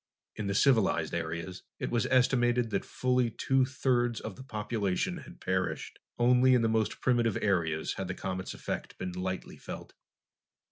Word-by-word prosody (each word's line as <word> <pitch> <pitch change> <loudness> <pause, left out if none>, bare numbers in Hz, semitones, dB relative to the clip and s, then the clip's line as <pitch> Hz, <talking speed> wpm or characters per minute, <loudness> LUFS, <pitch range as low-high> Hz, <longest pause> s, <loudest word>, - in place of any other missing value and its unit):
In 105 -2 -3
the 100 - -1
civilized 110 - +3
areas, 85 +2 -4 0.2
it - - -3
was 120 -2 +1
estimated 125 -2 +3
that 100 - 0
fully 125 -1 +1
two 130 +3 +2
thirds 125 -3 +1
of 110 -4 -6
the - - -10
population 110 - -2
had 140 - -12
perished. 95 0 -2 0.2
Only 125 +1 +5
in 120 - +3
the - - +3
most 110 -1 0
primitive 120 -4 +2
areas 80 -6 0
had 95 - -3
the 95 - -3
comet's 95 -1 -4
effect - - -5
been 90 - -4
lightly 95 +1 -4
felt. - - -8
110 Hz, 160 wpm, -30 LUFS, 95-125 Hz, 0.2 s, Only